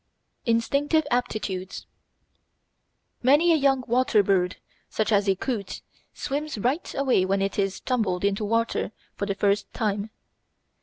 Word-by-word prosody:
Instinctive 280 +7 +2
Aptitudes 210 -6 -2 1.4
Many 295 +7 +5
a - - +5
young 270 -3 +2
water 240 -3 +3
bird, 185 -2 +1 0.3
such 215 0 -1
as 200 -1 +3
a 195 - +3
coot, 205 -2 -4 0.3
swims 295 -1 -4
right 255 - -1
away 265 -8 +2
when 195 +1 +1
it 195 +1 -2
is 195 -1 0
tumbled 205 -8 -1
into 200 +1 0
water 230 0 0 0.2
for 200 - -3
the 200 - -1
first 200 0 +1
time. 210 -1 -1
220 Hz, 135 wpm, -25 LUFS, 200-260 Hz, 1.4 s, Many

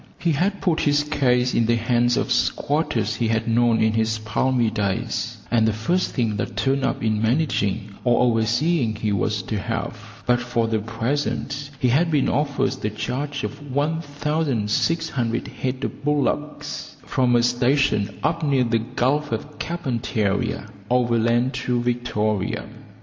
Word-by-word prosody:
He 170 - +1
had 190 +7 0
put 165 -4 +1
his 145 0 +2
case 125 -4 +2
in 115 - +2
the 120 - +3
hands 120 +1 +2
of - - -1
squatters 115 -8 0
he 115 - +1
had 110 0 0
known 115 0 +3
in 110 0 +3
his 110 0 +1
palmy 115 +2 +1
days, 100 -3 -2
and 115 -2 +4
the 110 - +2
first 170 - 0
thing 115 -5 0
that - - -4
turned 135 0 +1
up 135 - -1
in 110 -1 +1
managing 110 -5 0
or 120 -1 +3
overseeing 120 +3 +2
he 105 0 -1
was 100 +1 0
to 105 +1 -3
have; 115 +1 -5
but 125 0 +3
for 120 -2 0
the 110 -1 0
present 140 +5 -2
he 130 -3 +2
had 160 +8 +3
been 150 -4 +2
offered 140 -1 +1
the 105 - -3
charge 135 +7 -3
of - - -5
1600 145 -3 0
head 130 +1 -4
of 145 - -5
bullocks 150 +1 -2
from 125 -2 +2
a 120 - +4
station 120 -4 +2
up 165 +1 +1
near 140 -3 +3
the 115 -1 +1
Gulf 130 +5 0
of 150 - -5
Carpentaria 120 - -1 0.2
overland 120 +1 +2
to 125 -1 -1
Victoria. 120 -4 -1
120 Hz, 155 wpm, -23 LUFS, 110-145 Hz, 0.2 s, and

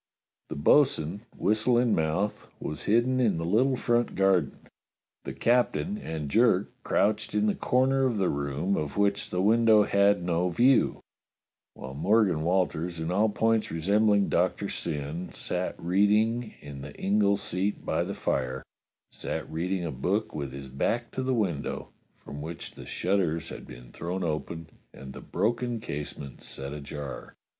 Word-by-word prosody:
The - - -5
bo'sun, 85 - +2
whistle 110 +5 +2
in 120 -2 +3
mouth, 80 +6 -1
was 75 - -5
hidden 120 +4 +3
in 110 -9 +2
the 80 - -3
little 125 +9 +3
front 120 0 +1
garden; 95 -6 +1 0.6
the - - -4
captain 125 - +1
and 80 - -5
Jerk 110 - +3
crouched 105 +1 0
in 105 0 +2
the 105 - +2
corner 130 +1 +2
of 120 -4 -1
the 95 -2 +2
room 70 +7 -1
of 75 +2 -3
which 100 0 +1
the 90 +1 -1
window 110 0 +5
had 100 -2 +3
no 90 +1 +1
view; 125 +10 +3 0.7
while 65 0 -8
Morgan 95 +2 +2
Walters, 85 -1 0
in 80 +1 -2
all 105 +4 +3
points 110 +1 +1
resembling 100 +5 +2
Doctor - - 0
Syn, 75 +4 -4
sat - - -3
reading 105 +6 +2
in 70 -2 -9
the 75 +1 -9
ingle 100 0 +2
seat 100 +2 -2
by - - 0
the - - -5
fire 65 0 -2 0.3
— - - -58
sat - - -4
read 85 +4 -2
ing 95 -3 -1
a 80 - -2
book 90 +11 -1
with 70 -3 -4
his 70 0 -8
back 115 - -1
to 130 - -3
the 130 0 0
window, 90 -11 -2 0.3
from 70 0 -9
which 80 +2 -7
the - - -12
shutters 85 -4 0
had - - -9
been - - -12
thrown 90 +3 -4
open 80 +1 -3 0.3
and 65 0 -9
the - - -9
broken 120 +2 -1
case 75 -7 -5
ment 70 -4 -9
set 70 +1 -7
ajar. 75 -1 -7
95 Hz, 165 wpm, -28 LUFS, 75-110 Hz, 0.7 s, window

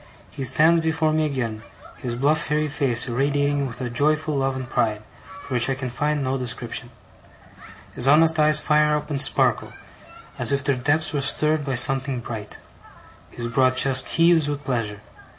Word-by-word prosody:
He 135 - -6
stands 160 +6 +3
before 160 -1 0
me 155 0 +1
again, 120 -6 -4 0.4
his 120 -2 -4
bluff 145 +5 0
hairy 150 +1 0
face 135 -4 +2
irradiating 140 +2 0
with 120 -1 -10
a 125 - -3
joyful 155 +4 0
love 135 -1 -1
and 130 -1 -6
pride, 110 -4 -1 0.4
for 130 - -8
which 120 +1 +2
I 135 - 0
can 130 -2 -5
find 145 +3 -1
no 130 +1 -2
description. 120 -1 -3 1.0
His 125 - 0
honest 160 +3 +4
eyes 150 0 +4
fire 150 0 +2
up, 150 +1 -5
and 140 -1 +1
sparkle, - - +1 0.7
as - - +1
if 140 0 0
their 140 0 +1
depths 145 +6 0
were 145 - -1
stirred 150 +2 +1
by 135 -2 -2
something 130 0 +2
bright. 110 -3 -8 0.7
His 120 - -7
broad 130 +2 +1
chest 130 0 +3
heaves 165 -2 +4
with 145 0 -4
pleasure. 115 -6 -3
140 Hz, 175 wpm, -22 LUFS, 125-150 Hz, 1.0 s, honest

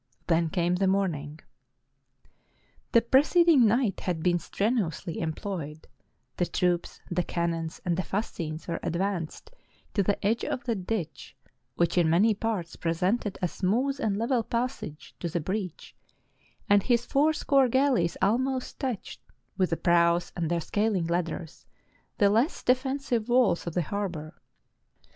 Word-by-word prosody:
Then 165 -1 +2
came 175 0 +1
the 195 +1 +2
morning.] 160 -6 -1 1.5
The 230 - +5
preceding 290 +1 +5
night 225 -2 +1
had 170 -4 -3
been 175 -1 +2
strenuously 195 -4 -2
employed: 160 -2 -5 0.5
the 175 - +1
troops, 175 -1 -1
the 175 +1 +1
cannons, 165 -1 -2
and 175 -1 +1
the 185 - 0
fascines 165 -5 -4
were 170 -1 -2
advanced 175 -2 -3 0.4
to 205 - +2
the 200 +1 +1
edge 225 +3 +1
of 255 - -3
the 240 -1 0
ditch, 185 -5 -4 0.4
which 170 +1 +2
in 165 -2 +3
many 200 +7 +4
parts 205 -5 -3
presented 185 +6 -1
a - - +3
smooth 245 - 0
and 210 -7 0
level 235 +2 +1
passage 235 - -4
to 170 - -3
the 170 - -1
breach; 185 +1 -5 0.7
and 205 0 +5
his 240 +2 +1
four 290 +5 +3
score 275 -3 +3
galleys 255 -10 +2
almost 255 +5 0
touched, 255 -7 -4 0.3
with 185 -1 +1
the 165 - 0
prows 170 0 +3
and 165 -3 -1
their 170 -1 0
scaling 205 0 0
ladders, 170 -1 -3 0.5
the 205 -3 +4
less 235 - +1
defensible 255 -2 +1
walls 245 -10 +3
of 170 - -4
the 175 - +1
harbor. 170 -4 -4
190 Hz, 145 wpm, -27 LUFS, 170-235 Hz, 1.5 s, The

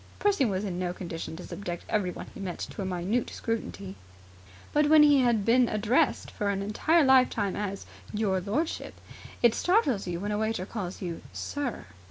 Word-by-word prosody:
Percy 400 -9 +2
was 195 -3 -1
in 180 -3 -3
no 180 -1 -1
condition 165 -3 -6
to 180 - -8
subject 175 -4 -6
everyone 185 -5 -1
he - - -10
met 185 -3 -4
to - - -6
a - - -2
minute 190 +6 -1
scrutiny. 160 - -4 0.8
But, 295 0 +3
when 310 -1 +8
you 290 -3 +6
have 225 -4 +2
been 240 +1 +4
addressed 230 +8 +1
for 205 - -2
an 200 0 -1
entire 310 +11 +3
lifetime 255 -7 +4
as 200 -1 -4 0.3
"your 205 -3 0
lordship", 230 - -2 0.5
it 235 -2 +6
startles 285 - +2
you 170 -1 -3
when 205 +3 -3
a 210 - -1
waiter 220 -4 -1
calls 190 -3 -5
you 170 -2 -4
"Sir". 285 -4 -4
210 Hz, 180 wpm, -28 LUFS, 185-255 Hz, 0.8 s, when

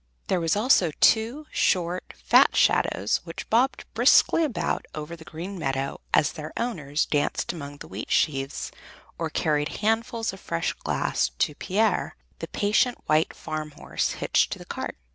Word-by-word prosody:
Them 185 - +2
were 165 - -2
also 210 - +4
two 235 +7 +3
short, 180 0 0
fat - - +6
shadows 100 +2 +2
which 165 -1 -8
bobbed 250 +5 +2
briskly 330 - +5
about 280 -8 -2
over 155 +2 -6
the 160 - -13
green 175 +5 -7
meadow 135 -2 -2
as 145 - +3
their 155 -1 -7
owners 155 - -1
danced 145 +3 -1
among 145 -3 -8
the - - -10
wheat 100 +3 -7
sheaves 135 -2 0 0.5
or - - -1
carried 150 -1 0 0.2
handfuls 225 0 0
of 195 - -10
fresh 85 - -2
grass - - -1
to 150 - +1
Pier, 210 +8 0 0.2
the - - -5
patient 215 +4 +1
white 155 +1 +2
farm 155 -1 -5
horse, - - -2
hitched - - +1
to - - -7
the - - -11
cart. - - -5
170 Hz, 160 wpm, -26 LUFS, 150-220 Hz, 0.5 s, fat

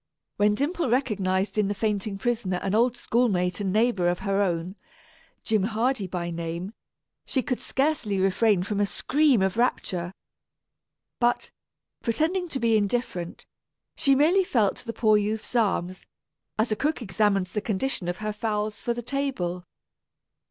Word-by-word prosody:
When 210 0 +3
Dimple 295 - -1
recognized 200 -5 0
in 210 - +2
the 205 - -1
fainting 205 -1 -1
prisoner 210 -4 -1
an 195 - -1
old 240 +2 +3
schoolmate 205 -8 +1
and 195 -2 -1
neighbor 215 -4 +2
of 175 0 +1
her 200 -1 +1
own, 180 -1 -1 0.7
Jim 220 -3 +2
Hardy 220 +1 0
by 175 -1 -3
name, 170 +4 -4 0.5
she 260 - -1
could 250 - -2
scarcely 265 -8 0
refrain 195 0 +3
from 205 +1 -2
a 205 - +2
scream 280 -2 +2
of 190 +3 0
rapture. 180 -7 0 1.1
But, 240 0 +1 0.5
pretending 330 +10 0
to 270 - -3
be 230 -2 +3
indifferent, 200 -5 -2 0.5
she 275 -3 +3
merely 335 +8 +4
felt 225 - +1
the 230 - -7
poor 215 -1 +4
youth's 215 +3 -3
arms, 185 -5 0 0.5
as 220 +1 +1
a - - +2
cook 295 +1 -1
examines 195 -2 +1
the 210 - -2
condition 210 -1 -2
of 175 - -2
her 215 - -1
fowls 210 -1 -2
for 235 - -1
the 240 - -5
table. 220 -11 -2
215 Hz, 150 wpm, -26 LUFS, 190-245 Hz, 1.1 s, merely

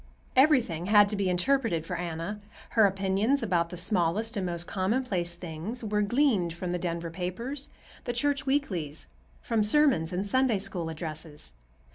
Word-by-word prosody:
Everything 255 - +3
had 205 0 +6
to 210 - -1
be 200 -2 0
interpreted 180 - +1
for 180 - -4
Anna. 175 +3 -4 0.3
Her 220 -3 +5
opinions 195 +7 +1
about 175 -5 +1
the 180 - -7
smallest 180 +4 0
and 190 -3 -1
most 170 0 -3
commonplace 190 -3 -1
things 175 +8 -6
were 210 -1 0
gleaned 210 - +2
from 175 +1 -4
the 180 - -1
Denver 170 -1 -3
papers, 230 - -4 0.4
the - - -1
church 285 +4 +1
weeklies, 180 - -1 0.4
from 225 -2 +1
sermons 225 - +3
and 185 +3 -2
Sunday 260 0 +2
School 190 -4 -3
addresses. 155 - -5
190 Hz, 155 wpm, -28 LUFS, 170-230 Hz, 0.4 s, had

